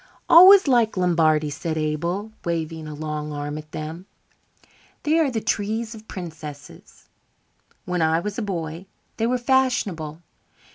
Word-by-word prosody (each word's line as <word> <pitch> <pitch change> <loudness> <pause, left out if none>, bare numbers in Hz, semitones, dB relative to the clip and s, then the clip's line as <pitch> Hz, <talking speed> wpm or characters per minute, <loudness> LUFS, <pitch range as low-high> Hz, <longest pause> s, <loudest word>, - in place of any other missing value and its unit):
"Always 375 +2 +9
liked 235 -6 +2
Lombardies," 155 -4 +2
said 160 -1 -3
Abel, 170 +7 -2
waving 165 -2 -3
a 150 - -7
long 150 0 -4
arm 145 +1 -4
at 155 0 -13
them. 160 +5 -7 1.0
"They 310 +2 +2
are 310 -4 +2
the 230 -4 -3
trees 220 +3 -2
of 220 -1 -13
princesses. 155 -6 -10 0.8
When 180 -1 -1
I 160 +1 +2
was 210 +5 -4
a - - -2
boy 170 -3 -5 0.3
they 225 - 0
were 250 +1 +1
fashionable. 210 - 0
170 Hz, 140 wpm, -23 LUFS, 155-220 Hz, 1.0 s, Always